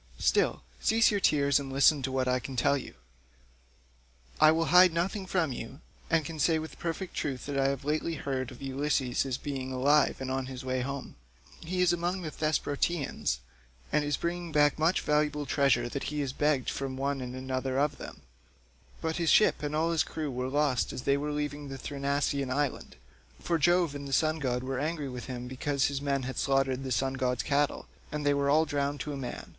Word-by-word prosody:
Still, - - +1 0.2
cease 225 0 +4
your 205 - +1
tears 140 -5 +3
and 135 -1 -6
listen 140 +2 +4
to 130 - -2
what 130 -1 0
I 125 0 +2
can 130 +1 -7
tell 125 +3 +3
you. 135 - -6 1.4
I 155 - +8
will 165 +1 +1
hide 180 0 +8
nothing 190 +3 -1
from 175 -6 +1
you, 120 +4 -7 0.3
and 165 -3 +2
can 160 +1 -6
say 160 +2 +3
with 160 0 -7
perfect 170 +2 -4
truth 130 -4 -3
that 145 - -4
I 135 - +3
have 135 0 -2
lately 155 +2 -1
heard 130 -4 -3
of 130 +1 -11
Ulysses 135 -1 0
as 130 -2 -2
being 135 -3 -4
alive 140 +3 +3
and 130 -1 -4
on 130 -1 -2
his 130 0 -7
way 130 0 -1
home; 140 - -5 0.4
he 180 +2 -2
is 175 -1 +4
among 175 +2 -1
the 155 - -4
Thesprotians, 150 - -1 0.5
and 150 - +2
is 145 -1 0
bringing 170 0 -3
back 145 0 +3
much 165 +4 +2
valuable 150 0 +1
treasure 135 -4 +2
that 140 - -4
he 150 0 -2
has 135 -2 -3
begged 145 -3 +1
from 135 -1 -4
one 140 0 -1
and 125 0 -5
another 130 0 -2
of 145 +1 +1
them; - - -9 0.8
but 160 0 -1
his 170 -2 +1
ship 210 - +5
and 150 0 -2
all 165 +2 +1
his 165 - +2
crew 155 -3 -3
were 125 0 -3
lost 145 -2 +1
as 125 - -6
they 140 - +3
were 145 +1 -2
leaving 145 0 -3
the 135 - -6
Thrinacian 140 0 -1
island, 140 +1 -2 0.4
for 170 -1 0
Jove 175 -1 +3
and 140 -1 -6
the 135 - -5
sun 155 +3 +2
god 125 -3 -1
were 130 0 -3
angry 150 -1 -2
with 125 -2 -6
him 125 -1 -6
because 135 +2 0
his 140 -1 -3
men 140 -2 0
had 130 +1 -4
slaughtered 135 -1 +1
the 130 - -4
sun 135 +2 +1
god's 125 -2 -1
cattle, 145 0 0 0.3
and 150 -1 -3
they 145 - +4
were 140 0 +1
all 155 +3 +4
drowned 145 -1 -1
to 150 - -4
a - - -4
man. 135 -3 -6
140 Hz, 210 wpm, -29 LUFS, 130-155 Hz, 1.4 s, I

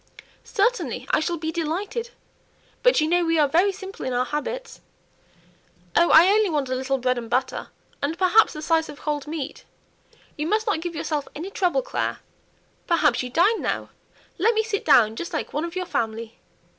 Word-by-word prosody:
"Certainly. 470 +3 0
I - - +4
shall 340 +2 -1
be 320 0 -3
delighted! 390 +9 -3 0.7
but - - +4
you 310 - +2
know 350 +2 +2
we 330 -1 +1
are 300 -2 +4
very 350 +8 +3
simple 390 0 -9
in 260 - -2
our 250 +1 +1
habits." 465 - -5 1.1
"Oh, 340 0 +5
I 325 +3 +8
only 420 0 +3
want 290 -5 -1
a - - -1
little 265 +1 -1
bread 250 -1 0
and 230 -1 -8
butter, 260 +1 -1 0.3
and 305 +4 -1
perhaps 375 +3 +4
a 305 - -6
slice 325 0 +1
of 295 - -10
cold 295 -1 -3
meat 300 -3 -5 0.7
you 300 +1 -3
must 435 +4 +1
not 410 -7 0
give 345 0 -5
yourself 300 -2 -2
any 350 +6 -6
trouble, 385 +6 +1
Clare - - -2 0.7
perhaps 330 -4 +3
you 250 - -5
dine 370 - +3
now? - - -3 0.5
let 445 +6 +3
me 440 - +2
sit 430 -2 -2
down 220 -2 +5
just 340 +7 -6
like 310 - -3
one 300 +3 -1
of 340 +1 -7
your 365 0 -2
family." 225 -5 -3
330 Hz, 190 wpm, -24 LUFS, 290-390 Hz, 1.1 s, I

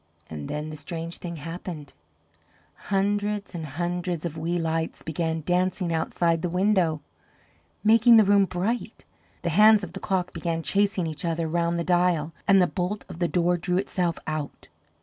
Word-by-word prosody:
And 75 -2 -6
then 150 +1 -4
the 155 - -7
strange 165 +3 -6
thing 170 -1 -6
happened: 165 -1 -7 1.0
hundreds 205 +1 0
and 165 -3 -5
hundreds 175 +3 -3
of 165 -2 -4
wee 165 +2 -1
lights 165 -1 -2
began 160 0 -2
dancing 180 -1 0
outside 165 +1 0
the 180 - -1
window, 180 -4 +2 0.8
making 225 +2 +7
the 220 - +7
room 200 0 +4
bright; 195 +7 -3 0.4
the 170 - 0
hands 210 +3 +6
of 175 -2 -7
the 195 - -5
clock 185 -2 -1
began 165 -1 -2
chasing 200 -1 +1
each 155 -2 -5
other 165 -1 -1
round 170 +1 0
the 170 - -1
dial, 175 -3 +1
and 195 -1 +6
the 180 - +5
bolt 190 +3 -3
of 165 - -9
the 175 - +2
door 175 0 +1
drew 180 +1 -1
itself 180 -3 -1
out. 155 -2 -5
175 Hz, 170 wpm, -26 LUFS, 165-190 Hz, 1.0 s, making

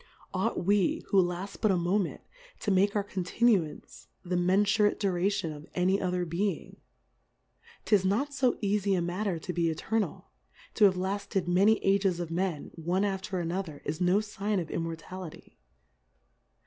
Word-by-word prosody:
Ought - - -1
we, 200 -1 +2
who 195 - +5
laft 180 +3 -4
but 215 - +3
a 190 - +3
Moment, 175 +2 0 0.4
to 210 - 0
m.ake 195 +2 +3
our 205 - +1
Continuance 195 -2 0 0.2
the 180 +1 -1
menfurate 205 +4 +3
Dura 190 -2 +1
tion 200 -6 -2
of 150 +2 -11
any 185 +2 +2
other 180 -1 -1
Being? 185 +5 -2 1.1
'Tis 205 -3 +4
not 235 +10 0
fo 265 -3 +2
eafie 200 -1 +1
a - - 0
matter 180 +1 -2
to 180 +3 -5
be 170 -1 +1
Eternal, 200 +3 -2 0.4
To 205 - +6
Iiave 185 - -4
lafted 195 -1 -2
many 195 +5 +4
Ages 195 -2 +2
of 170 -2 -4
Men, 175 -3 -2
o.ie 185 +4 +1
after 190 -1 -2
another, 170 -3 -4
Is 155 +4 -3
no 180 +3 +3
Sign 210 -1 -2
of 165 -3 -5
Immortality. 165 +1 -6
190 Hz, 155 wpm, -29 LUFS, 175-205 Hz, 1.1 s, To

